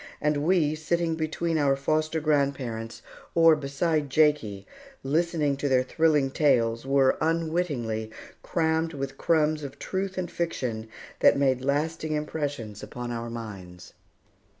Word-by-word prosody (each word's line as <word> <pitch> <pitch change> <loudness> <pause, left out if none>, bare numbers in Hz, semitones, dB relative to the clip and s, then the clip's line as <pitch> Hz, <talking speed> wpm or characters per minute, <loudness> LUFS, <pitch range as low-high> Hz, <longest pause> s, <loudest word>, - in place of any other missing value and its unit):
And 150 0 +1
we, 155 0 +2
sitting 165 +2 -1
between 160 +1 -1
our 140 -2 +3
foster 155 +3 0
grandparents, 135 -7 -1 0.3
or 165 -1 +7
beside 150 +1 -1
Jakie, 135 -10 +2 0.4
listening 150 0 +1
to 140 0 -1
their 130 -1 +3
thrilling 150 -1 +2
tales, 120 -5 +2
were, 135 -1 +3
unwittingly, 155 -9 -1 0.3
crammed 160 0 0
with 135 0 -5
crumbs 155 -1 +2
of 140 -1 -7
truth 190 0 -3
and 180 -1 -3
fiction 125 -11 -3 0.3
that - - +5
made 130 -2 +2
lasting 155 +3 -1
impressions 145 -8 -4
upon 120 0 -6
our 115 0 -4
minds. 100 -7 -9
145 Hz, 125 wpm, -26 LUFS, 130-160 Hz, 0.4 s, or